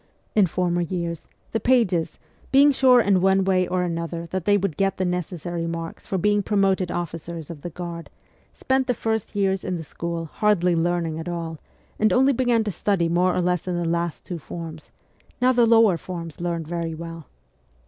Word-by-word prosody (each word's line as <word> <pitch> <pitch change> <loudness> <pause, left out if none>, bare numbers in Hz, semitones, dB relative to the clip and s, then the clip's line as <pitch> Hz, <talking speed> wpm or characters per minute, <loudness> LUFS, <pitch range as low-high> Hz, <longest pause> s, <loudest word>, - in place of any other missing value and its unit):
In 205 -3 +4
former 175 0 0
years, 170 -2 -3 0.2
the 225 - 0
pages, 220 -11 +2 0.3
being 280 +2 +7
sure 255 -2 +5
in 195 -4 +3
one 190 0 +4
way 185 -1 +2
or 180 0 0
another 170 -1 -3
that 185 -2 -3
they 205 0 +4
would 195 -5 -2
get 195 +3 0
the 185 - 0
necessary 175 -1 -3
marks 165 0 -6
for 190 - -1
being 205 +3 +2
promoted 195 -3 +1
officers 170 -1 -5
of 155 -4 -10
the 175 - -5
Guard, 170 0 -7 0.4
spent 265 0 0
the 250 - +1
first 220 -2 -2
years 195 -2 +1
in 185 - -2
the 165 - -5
school 170 +1 -4
hardly 180 0 +2
learning 165 -1 0
at 165 +2 -5
all, 165 -2 -4 0.4
and 215 -1 +3
only 265 +7 +4
began 240 -2 +2
to 210 - -2
study 185 -3 0
more 180 +2 +2
or - - +1
less 180 0 0
in 180 - -1
the 175 - -1
last 170 0 -2
two 175 -2 -5
forms; 160 +1 -8 0.5
now 255 +1 +4
the 240 -2 +4
lower 225 -5 +5
forms 170 -2 -7
learned 170 -2 -2
very 165 -1 -3
well. 165 -2 -8
175 Hz, 190 wpm, -24 LUFS, 170-200 Hz, 0.5 s, being